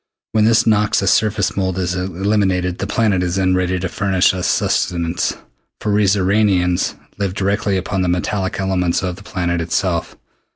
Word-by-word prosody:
When 110 -1 +3
this 115 +1 +4
noxious 105 -3 +2
surface 110 0 +1
mold 95 -2 -1
is 90 -1 -1
eliminated, 95 0 -1
the 100 - -2
planet 105 -3 +1
is 90 0 -1
then 95 -1 +2
ready 95 0 0
to 95 - -2
furnish 95 0 +1
us 90 -1 -2
sustenance, 85 -1 0 0.4
for 105 - -1
we 105 0 +3
Xoranians 95 -2 +2 0.2
live 100 -2 -2
directly 100 0 0
upon 95 +1 -2
the 90 - 0
metallic 95 +2 -1
elements 95 -1 0
of 90 -1 -2
the 95 - -14
planet 85 -4 -2
itself. 85 +1 -2
95 Hz, 165 wpm, -18 LUFS, 90-100 Hz, 0.4 s, this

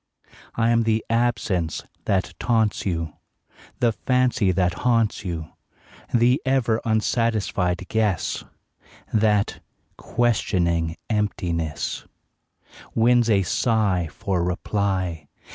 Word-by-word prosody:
I 115 0 +2
am 115 0 +4
the 110 -1 +1
absence 115 -8 0 0.2
that 95 -1 0
taunts 110 -4 +1
you, 80 -4 -2 0.7
The 120 -2 +4
fancy 125 -4 +1
that 90 -1 0
haunts 115 -4 +2
you; 85 -4 -4 0.6
The 120 +3 +3
ever 125 -4 +1
unsatisfied 110 -5 0
guess 105 -6 0 0.7
That, 105 -1 +2 0.4
questioning 85 -8 0
emptiness, 90 -7 -2 0.9
Wins 120 0 +4
a 100 -3 +4
sigh 100 -3 +1
for 90 +2 -1
reply. 90 -3 -1
105 Hz, 95 wpm, -23 LUFS, 90-115 Hz, 0.9 s, am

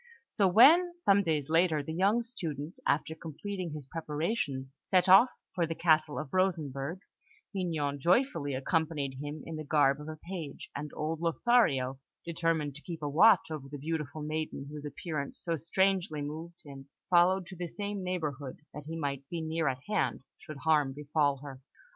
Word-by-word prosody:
So 200 -6 +2
when, 335 - +6
some 200 - +4
days 155 -6 0
later, 160 -2 +2
the 160 - -5
young 200 +7 +2
student, 165 - -5
after 155 +2 +1
completing 170 +3 -6
his 150 -3 -7
preparations, 150 - -3
set 185 -1 +2
off 195 +7 +8 0.2
for 175 -3 0
the 165 - -3
Castle 155 -3 +2
of 150 - -5
Rosenberg, 165 -3 -1 0.5
Mignon 155 -7 -1
joyfully 170 - +2
accompanied 145 -2 -1
him 145 +1 -6
in 165 -1 -6
the 155 - -5
garb 145 -1 +3
of 150 - -9
a 155 - -5
page; 165 -3 -7
and 150 +1 -4
old 155 +1 -2
Lothario, 165 - +2 0.3
determined 165 -3 0
to - - -13
keep 165 -2 -7
a - - 0
watch 185 +5 +5
over 140 -3 -6
the 145 - -6
beautiful 155 0 -4
maiden 155 -2 -3
whose 150 -1 -7
appearance 150 -1 -5
so 170 -1 -1
strangely 180 -1 0
moved 165 +4 -7
him, 140 -1 -11 0.2
followed 180 +2 +5
to 185 - -10
the 175 0 -4
same 205 +2 -4
neighbourhood, 150 -7 -3 0.2
that 150 0 -9
he 165 +1 -4
might 140 -3 -3
be 170 - -3
near 160 0 -1
at 130 0 -2
hand 175 - 0 0.2
should 155 - -9
harm 150 -4 +3
befall 145 0 +1
her. 135 -2 -9
160 Hz, 170 wpm, -30 LUFS, 145-180 Hz, 0.5 s, off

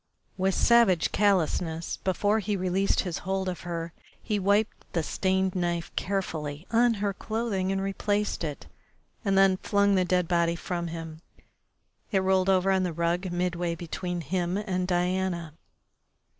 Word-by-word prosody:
With 190 0 +1
savage 235 -8 +4
callousness, 170 -4 +1
before 205 +3 +1
he 210 0 -1
released 185 +2 +1
his 175 -3 -4
hold 190 0 -2
of 180 -1 -3
her, 170 -1 -5 0.3
he 210 -2 -1
wiped 200 +3 0
the 165 - 0
stained 190 +2 0
knife 175 -2 -2
carefully 160 -5 -3
on 235 0 +4
her 200 -1 -1
clothing 215 -3 -2
and 195 - 0
replaced 205 +1 -1
it, 150 -3 -5 0.6
and 195 -3 +1
then 195 -1 +5
flung 200 0 +2
the 185 -1 +3
dead 180 -1 +1
body 170 -1 +2
from 170 0 -3
him. 165 -1 -7 0.9
It 190 -3 +2
rolled 190 0 +2
over 190 0 +3
on 190 -1 +3
the 180 -2 -1
rug 170 +3 -1
midway 175 -1 -1
between 175 +1 -4
him 175 +4 -1
and 185 -3 -2
Diana. 180 -2 -1
185 Hz, 150 wpm, -27 LUFS, 170-195 Hz, 0.9 s, then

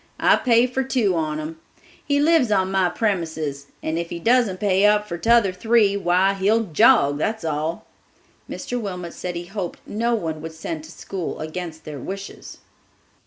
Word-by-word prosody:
I - - +5
pay 235 -1 +4
for 255 +1 -2
two 240 -8 +1
on 155 -2 -1
'em. 160 +1 -6 0.4
He 285 0 +1
lives 305 -4 +4
on 190 -2 +1
my 190 -2 +2
premises; 160 -8 -2 0.2
and 160 +1 -1
if 170 0 -4
he 175 - -5
doesn't 225 -1 +2
pay 195 -2 +2
up 210 0 +4
for 170 - -4
t'other 225 -2 +4
three, 215 0 +3
why, 190 0 +2
he'll 205 +4 +2
jog, 145 -5 +4
that's 220 +2 -2
all." 155 +2 -2 0.6
Mr. 245 -1 -4
Wilmot 180 -5 -5
said 180 -1 -5
he 170 0 -5
hoped 190 -1 -5
no 235 +3 0
one 160 -7 -4
would 160 0 -7
send 160 -1 -6
to 160 - -12
school 185 0 -5
against 160 0 -6
their 150 -2 -7
wishes. 195 +8 -8
185 Hz, 175 wpm, -22 LUFS, 160-220 Hz, 0.6 s, I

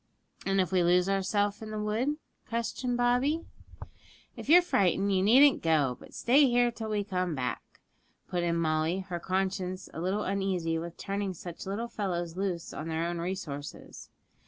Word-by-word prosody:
'And 195 0 +2
if 185 -1 +1
we 185 -1 +3
lose 180 +1 +4
ourselves 200 +2 0
in 220 - -7
the 215 - -4
wood?' 220 +8 0 0.3
questioned 240 +1 -2
Bobby. 250 +7 +2 0.9
'If - - -8
you're 350 +3 +8
frightened, 200 - +2
you 185 - +3
needn't 260 +8 +6
go, 150 -6 +2
but - - -14
stay 275 +4 +5
here 240 0 +3
till 225 -1 -6
we 210 -1 0
come 185 -4 -2
back,' 125 -2 -5 0.5
put 180 - -1
in 170 -1 0
Molly, 160 +2 +1
her 185 -2 -5
conscience 185 0 -2
a 160 - -5
little 195 +4 0
uneasy 185 -4 -1
with 170 +1 -7
turning 195 -1 -3
such 175 +2 -8
little 210 +5 -2
fellows 175 -6 -3
loose 185 -3 -3
on 155 - -5
their 165 +1 -1
own 170 0 -2
resources. 165 -5 -6
190 Hz, 170 wpm, -29 LUFS, 175-215 Hz, 0.9 s, you're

